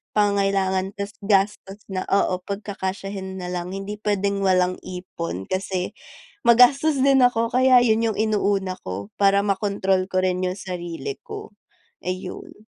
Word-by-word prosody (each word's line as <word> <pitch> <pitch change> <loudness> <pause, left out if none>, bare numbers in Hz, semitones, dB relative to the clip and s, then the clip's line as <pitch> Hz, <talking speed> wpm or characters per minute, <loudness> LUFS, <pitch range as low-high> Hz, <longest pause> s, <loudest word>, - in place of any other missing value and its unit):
pangangailangan, 195 -2 +1
tas 200 0 -4 0.2
gastos 200 0 +1
na, 185 -1 -2
oo, 190 -2 +2
pagkakasyahin 195 -1 -5
na 180 - -5
lang, 180 0 -4
hindi 195 +2 -5
puwedeng 200 -1 0
walang 185 -1 +2
ipon 170 - -6
kasi 185 -1 -2 0.6
magastos 270 +5 +5
din 275 -1 +5
ako 230 -2 +1
kaya 255 0 +6
'yun 225 -1 +3
'yung - - -7
inuuna 200 -3 +1
ko 100 +3 -5
para 200 0 +5
ma-kontrol 195 -2 +1
ko 185 0 +2
rin 185 0 0
'yung 180 +1 -2
sarili 180 - -5
ko, 425 - -8 0.5
eh, 180 - -1
'yun. 320 - -9
195 Hz, 140 wpm, -23 LUFS, 185-215 Hz, 0.6 s, kaya